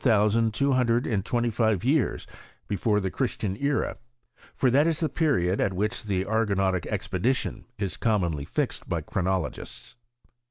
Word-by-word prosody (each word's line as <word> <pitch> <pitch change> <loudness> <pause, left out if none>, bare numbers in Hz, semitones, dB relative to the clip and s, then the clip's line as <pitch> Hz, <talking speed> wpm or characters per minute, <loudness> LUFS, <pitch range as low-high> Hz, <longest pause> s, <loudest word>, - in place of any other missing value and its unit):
5 110 -4 +4
sand 115 0 +2
two 140 +5 +1
hundred 125 -2 +2
and 100 -5 0
twenty 120 +1 0
five 110 -4 +1
years 135 +1 +1 0.4
before 105 +1 +1
tke 95 -2 -2
Christian 110 -7 -1
era: 140 +5 -1 0.6
for 130 - +2
that 145 +5 +4
is 165 -2 +1
the 160 - +1
period 105 - +1
at 95 - +1
which 105 +3 -2
the 95 -2 0
Ar* 110 +1 +1
gonautic 95 -3 0
expedition 120 +9 -1
is 100 -2 -3
commonly 85 -10 0
fixed - - -3
by - - -1
chronolo 95 0 -1
gists. 125 - -10
110 Hz, 165 wpm, -26 LUFS, 95-125 Hz, 0.6 s, 5